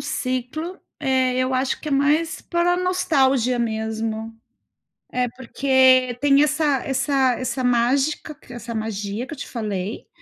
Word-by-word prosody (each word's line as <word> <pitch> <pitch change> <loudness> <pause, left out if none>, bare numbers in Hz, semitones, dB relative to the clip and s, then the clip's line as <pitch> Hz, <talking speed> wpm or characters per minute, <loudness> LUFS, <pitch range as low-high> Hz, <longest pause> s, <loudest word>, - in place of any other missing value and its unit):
ciclo, 255 +8 -3 0.2
eh, 260 -3 +1
eu 255 0 0
acho 260 +1 0
que - - -11
é - - -2
mais 295 +4 +1
para 345 0 +1
a - - +1
nostalgia 275 -9 +2
mesmo. 220 0 -3 0.8
É, 250 0 +1
porque 260 0 +3
tem 280 0 +4
essa 300 -2 +2
essa 270 -1 +1
essa 255 0 -2
mágica, 265 +5 +1
essa 240 -1 -7
magia, 215 +1 -4
que - - -7
eu - - -21
te - - -7
falei. 210 -3 -4
260 Hz, 140 wpm, -22 LUFS, 235-285 Hz, 0.8 s, tem